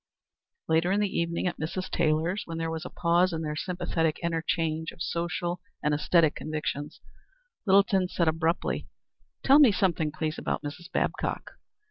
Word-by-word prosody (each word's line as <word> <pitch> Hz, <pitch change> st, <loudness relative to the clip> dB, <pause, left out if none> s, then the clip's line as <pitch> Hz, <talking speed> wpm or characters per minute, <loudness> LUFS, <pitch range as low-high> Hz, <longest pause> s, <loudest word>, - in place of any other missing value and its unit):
Later 165 Hz, +3 st, +2 dB
in 200 Hz, -, +2 dB
the 205 Hz, -2 st, -1 dB
evening 170 Hz, +1 st, -1 dB
at 180 Hz, -, -2 dB
Mrs. 175 Hz, +4 st, -3 dB
Taylor's, 160 Hz, +6 st, +1 dB
when 165 Hz, -1 st, -5 dB
there 165 Hz, 0 st, -2 dB
was 160 Hz, -1 st, -4 dB
a -, -, -5 dB
pause 175 Hz, +2 st, +2 dB
in 160 Hz, -1 st, -3 dB
their 150 Hz, -1 st, -3 dB
sympathetic 165 Hz, -2 st, -1 dB
interchange 165 Hz, -1 st, -1 dB
of -, -, -17 dB
social 170 Hz, +1 st, -2 dB, 0.2 s
and 150 Hz, -, +2 dB
æsthetic 155 Hz, +1 st, +3 dB
convictions, 150 Hz, -1 st, -4 dB, 0.7 s
Littleton 195 Hz, -1 st, +4 dB
said 170 Hz, -2 st, 0 dB
abruptly: 160 Hz, +2 st, 0 dB, 0.6 s
"Tell 275 Hz, +2 st, +7 dB
me 275 Hz, -7 st, +8 dB
something, 170 Hz, -5 st, +1 dB
please, 155 Hz, 0 st, -3 dB
about -, -, -2 dB
Mrs. 165 Hz, +4 st, -7 dB
Babcock. -, -, -2 dB
165 Hz, 155 wpm, -28 LUFS, 160-180 Hz, 0.7 s, me